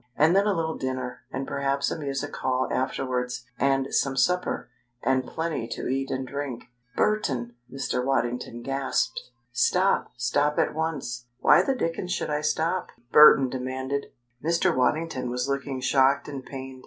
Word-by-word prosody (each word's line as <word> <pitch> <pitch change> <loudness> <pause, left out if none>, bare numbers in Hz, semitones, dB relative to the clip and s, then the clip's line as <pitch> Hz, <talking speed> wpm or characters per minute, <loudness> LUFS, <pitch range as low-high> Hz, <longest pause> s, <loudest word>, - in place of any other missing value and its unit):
And 160 +4 +4
then 200 +1 +4
a 205 - +3
little 160 -1 -2
dinner, 130 -1 -4
and 135 +1 -3
perhaps 140 0 0
a - - -1
music 140 0 -3
hall 130 0 0
afterwards, 125 -2 -2
and 135 0 +1
some 135 -1 +1
supper, 180 +8 +1 0.4
and 130 -1 +1
plenty 160 -8 -3
to - - -5
eat 135 +1 -1
and 130 0 -2
drink 140 -3 -4 0.2
" 125 0 -38
"Burton!" 130 - 0 0.2
Mr. 135 -1 -2
Waddington 120 -2 -1
gasped. 135 -3 -1 0.2
"Stop! 180 +10 +2
Stop 145 +5 +1
at - - +2
once!" 145 -7 -3
"Why - - +6
the 270 - 0
dickens 180 -4 -2
should 165 - -1
I 150 0 0
stop?" 165 +4 0 0.2
Burton 150 -3 +8
demanded. 130 +2 -3 0.4
Mr. 165 +2 +2
Waddington 130 0 0
was 125 +2 -2
looking 140 -1 -2
shocked 135 +1 +3
and 140 -3 -6
pained. 130 0 -8
135 Hz, 155 wpm, -26 LUFS, 130-150 Hz, 0.4 s, Burton